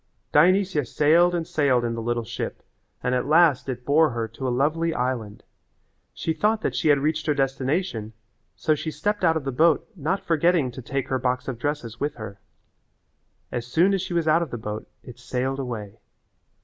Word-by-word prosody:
Dionysia 185 -4 +4
sailed 165 +7 +3
and 170 -1 -1
sailed 135 -7 +1
in 115 - -1
the 115 - -4
little 120 +1 -1
ship 110 - -5 0.4
and 125 - 0
at 125 +1 0
last 155 -4 +4
it 125 -1 -5
bore 155 +2 +4
her 115 -2 -3
to 130 +4 -5
a - - +1
lovely 155 +6 +1
island. 120 -5 -3 0.7
She 160 - -2
thought 215 +5 +1
that 130 - -1
she 130 - 0
had 145 -1 +6
reached 155 +3 -1
her 150 - +2
destination, 135 - -1 0.4
so 155 - +1
she 155 +1 -3
stepped 195 +7 -2
out 165 -2 +4
of 155 - -4
the 135 - -2
boat 160 +5 +3
not 180 +4 -2
forgetting 165 -4 +2
to 130 - -8
take 135 +2 -3
her 130 -1 0
box 125 0 -1
of 125 -4 -4
dresses 125 -4 -3
with 145 +1 -2
her. 100 -3 -8 1.1
As 120 -1 -4
soon 170 +10 +3
as 195 - +1
she 175 -1 -4
was 165 -2 +1
out 160 +2 +4
of 170 - -3
the 120 - -5
boat 105 -1 -6
it 125 -1 -12
sailed 130 +2 -2
away. 115 -6 -6
140 Hz, 200 wpm, -24 LUFS, 125-160 Hz, 1.1 s, had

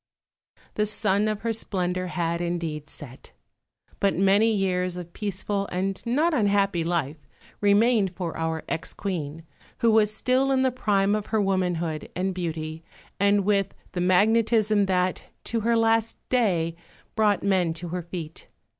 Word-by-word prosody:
The 210 0 0
sun 205 0 +1
of 215 -1 -2
her 230 0 -1
splendour 185 -4 -2
had 170 -1 -2
indeed 165 -3 -3
set, 130 - -12 0.7
but 200 -1 +2
many 200 +4 +4
years 185 -3 0
of 175 -1 -8
peaceful 200 -1 -2
and 190 +2 -2
not 305 +8 +2
unhappy 200 - +2
life 160 -3 -1 0.4
remained 205 -1 +3
for 175 -3 -4
our 160 -1 -2
ex 165 - -4
Queen, 165 -5 -4 0.3
who 230 -3 +3
was 215 -1 +4
still 255 +5 +1
in 265 -1 +2
the 260 - +2
prime 205 -5 +1
of 210 -1 -2
her 220 - 0
womanhood 180 -5 -1
and 185 +1 -1
beauty 160 -2 -4 0.4
and 200 0 +3
with 200 -1 +1 0.2
the 180 - -3
magnetism 215 +2 +3
that, 185 -1 0 0.2
to 230 - -1
her 230 +1 +2
last 225 0 +2
day, 175 -10 +1 0.4
brought 210 -3 +2
men 190 -4 +2
to 170 +1 -7
her 180 +1 -3
feet. 170 -2 -8
195 Hz, 150 wpm, -25 LUFS, 175-215 Hz, 0.7 s, many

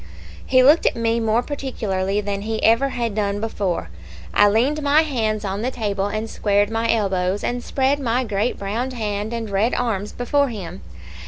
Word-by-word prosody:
"He 255 -1 +4
looked 295 +5 +5
at - - +1
me 230 0 0
more 225 +1 +1
particularly 210 -9 -2
than 200 -1 -3
he 220 +2 -3
had - - -4
ever 235 +1 +2
done 205 -1 -1
before. 190 - -2 0.4
I 205 - +5
leaned 260 +9 +1
my 290 +2 +4
hands 220 -8 -1
on 195 +1 -3
the 245 - 0
table, 205 -5 -2
and 215 +2 -3
squared 205 -1 +1
my 225 +1 +1
elbows, 195 -3 0
and 245 0 -2
spread 270 +1 +1
my 250 -1 0
great 215 +1 -1
browned 230 +6 -3
hand 210 -2 -3
and 230 -1 -3
red 205 +4 +1
arms 210 -4 -2
before 280 +3 +1
him. 190 -6 -7
220 Hz, 180 wpm, -21 LUFS, 200-245 Hz, 0.4 s, looked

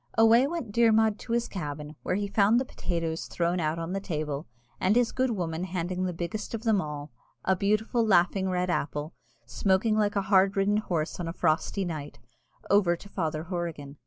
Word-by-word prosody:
Away 225 +4 +6
went 305 -9 -4
Dermod 220 -1 +3
to 235 - -5
his 235 0 +1
cabin, 150 -4 -6
where - - -1
he 205 +1 -1
found 205 +3 +4
the 260 - -2
potatoes 165 -7 -3
thrown 175 +1 0
out 155 0 0
on 165 +2 -4
the 195 - -1
table, 155 -5 -4 0.3
and 190 +3 +2
his 245 -1 +3
good 260 0 +1
woman 175 -6 -2
handing 180 0 -2
the 180 - -1
biggest 175 +7 -4
of 225 - -6
them 220 -5 +3
all, 150 -1 -6 0.3
a 190 - +3
beautiful 215 +5 +1
laughing 190 -2 +3
red 180 0 0
apple, 150 -1 -2 0.3
smoking 190 - +1
like 210 0 +1
a 200 - +1
hard 195 0 +3
ridden 200 +2 +3
horse 170 -7 -2
on 175 - -3
a 165 - -4
frosty 180 +5 0
night, 150 -8 -5 0.5
over 195 -4 +4
to 185 - -13
Father 160 -5 -2
Horrigan. 165 -5 -5
185 Hz, 190 wpm, -28 LUFS, 165-210 Hz, 0.5 s, Away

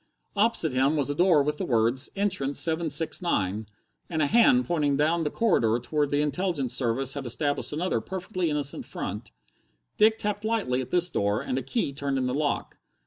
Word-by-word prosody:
Opposite 200 - +2
him 135 +4 +2
was 145 -2 0
a - - -1
door 170 -2 +4
with 150 +1 -2
the - - -1
words 120 +3 +1
"Entrance 185 -9 0
769" 160 - 0 0.4
and 160 -3 -1
a - - +3
hand 235 - +4
pointing 150 -5 0
down 160 +3 +2
the 150 - -1
corridor 130 - +2
to 120 - -11
where 150 -1 +2
the 145 +1 0
Intelligence 150 -5 -1
service 130 +2 0
had 140 -3 -5
established 145 +4 -1
another 170 +5 -1
perfectly 185 -2 -3
innocent 145 -2 -2
front. - - -6 0.7
Dick 220 +1 +4
tapped 210 -1 -3
lightly 215 - 0
at 125 - -7
this 175 -1 +2
door, 100 -3 0
and 130 - -2
a - - -5
key 140 - -2
turned 140 0 -2
in 130 - 0
the 125 - -1
lock. 145 +1 -2
150 Hz, 190 wpm, -26 LUFS, 135-180 Hz, 0.7 s, door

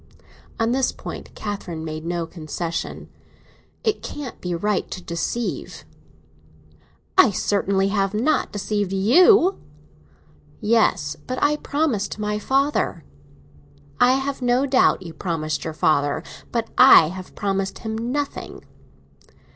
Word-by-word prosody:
On 225 +1 +1
this 260 0 +1
point - - -8
Catherine 185 -6 -5
made 155 0 -5
no 170 0 -2
concession. 165 0 -5 0.8
"It 435 -3 0
can't 285 -5 -7
be 180 -1 -2
right 205 +3 -1
to - - -5
deceive." 175 +8 -4 1.3
"I 255 - +8
certainly 195 -1 +1
have 195 -1 0
not 245 +9 +1
deceived 205 -1 -2
you!" 355 - +5 1.0
"Yes; 210 -9 +2
but 255 - -3
I 295 +1 +2
promised 285 -11 -1
my 210 0 -2
father—" 270 - 0 1.0
"I 250 +1 +6
have 270 0 -2
no 250 +2 +2
doubt 260 -8 +3
you 165 -2 -8
promised 155 -3 -3
your 160 -1 -4
father. 145 -2 +1 0.3
But 230 -1 -2
I 250 -11 +9
have 185 +1 -9
promised 195 -1 -2
him 220 0 -2
nothing!" 255 +6 -4
210 Hz, 120 wpm, -22 LUFS, 175-255 Hz, 1.3 s, I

